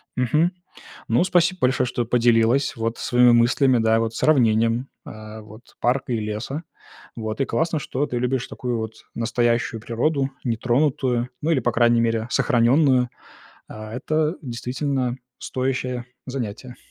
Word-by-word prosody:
Мгм. 150 +8 +2 0.6
Ну, 120 +9 +3
спасибо 180 0 +2
большое, 130 0 +2
что 120 -1 -2
поделилась, 120 +2 +2
вот 115 0 -2
своими 125 0 +4
мыслями, 120 +2 +4
да, 110 0 +3
вот 115 0 -2
сравнением, 115 -3 +2 0.2
а, 110 0 -9
вот 110 +3 -15
парка 125 0 0
и - - +1
леса. 110 +9 -4 0.5
Вот. 110 +2 -3
И 135 - +2
классно, 165 -1 0
что 140 0 -2
ты 125 - -4
любишь 125 +1 -1
такую 125 -2 -3
вот 110 -1 -4 0.2
настоящую 115 0 0
природу, 135 +5 0 0.2
нетронутую, 125 +1 0
ну, 160 - 0
или, 145 - +3
по 120 - +1
крайней 120 0 +4
мере, 115 -1 0
сохраненную. 125 0 +3 0.6
А, 110 0 -9
это 155 +5 0
действительно 125 0 -2 0.2
стоящее 130 -1 -2 0.2
занятие. 125 -1 -6
120 Hz, 140 wpm, -23 LUFS, 115-135 Hz, 0.6 s, своими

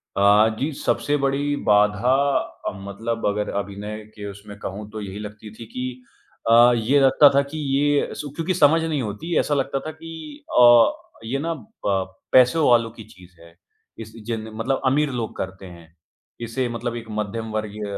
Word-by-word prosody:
अ, 105 +2 +5
जी, 145 +4 -1
सबसे 145 +1 0
बड़ी 140 +1 0
बाधा 105 +4 +3 0.5
अ, - - 0
मतलब 115 +3 -4
अगर 105 0 -1
अभिनय 100 +1 -6 0.2
के 105 -2 -8
उसमें 100 +1 -11
कहूँ 105 +1 -6
तो 110 0 -6
यही 100 0 -7
लगती 105 0 -9
थी 115 - -10
कि 125 0 -5 0.5
अ, 120 +1 +7
ये 120 +5 +2
लगता 135 +1 +6
था 140 - +5
कि 155 - -5 0.2
ये 145 0 +1
सु 150 - -6
क्योंकि 170 +3 -1
समझ 160 -1 +4
नहीं 155 -4 -1
होती, 115 +10 -4
ऐसा 150 - 0
लगता 135 -1 0
था - - -3
कि 165 - -10 0.2
अ, 120 -1 +7 0.3
ये 130 +5 -2
ना 165 +3 -2 0.3
प 95 -2 0 0.2
पैसों 130 +5 +5
वालों 115 -2 +4
की 110 0 -11
चीज़ 90 -3 -18
है। 85 0 -17 0.4
इस 110 -1 -8
जेन 110 -1 -4
मतलब 125 +5 -1
अमीर 145 +3 +2
लोग 120 -3 -4
करते 95 +1 -6
हैं, 85 -2 -13 0.5
इसे 120 +2 -2
मतलब 120 0 -4
एक 115 -1 -6
मध्यमवर्गीय 105 0 -4
115 Hz, 175 wpm, -22 LUFS, 105-140 Hz, 0.5 s, अ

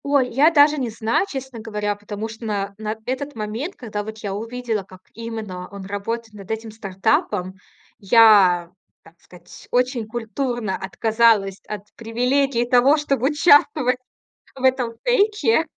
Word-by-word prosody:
Ой, 280 -3 +2
я 280 +6 +5
даже 300 -1 +5
не 250 -3 -2
знаю, 225 - 0
честно 265 -3 -6
говоря. 210 -2 -3
Потому 205 +1 -6
что 225 +1 -9
на 200 -2 -2
на 215 0 -3
этот 275 +2 -4
момент, 225 - -4
когда 210 -4 -5
вот 220 +1 -8
я 200 -2 -4
увидела, 225 0 -3
как 185 -1 -16
именно 220 -6 -6
он 200 -1 -9
работает 220 +3 -4
над 200 -2 -12
этим 220 0 -4
стартапом, 195 -2 -1 0.4
я, 195 -5 +5 0.3
так 165 - -18
сказать, 175 -1 -15
очень 250 -2 0
культурно 235 -2 -3
отказалась 215 -1 +1
от 210 -1 -6
привилегии 245 +2 0
того, 250 +4 +4
чтобы 275 -3 0
участвовать 290 -4 +4 0.6
в 265 - -9
этом 255 -3 +2
фейке, 430 -6 +2
225 Hz, 145 wpm, -21 LUFS, 205-260 Hz, 0.6 s, я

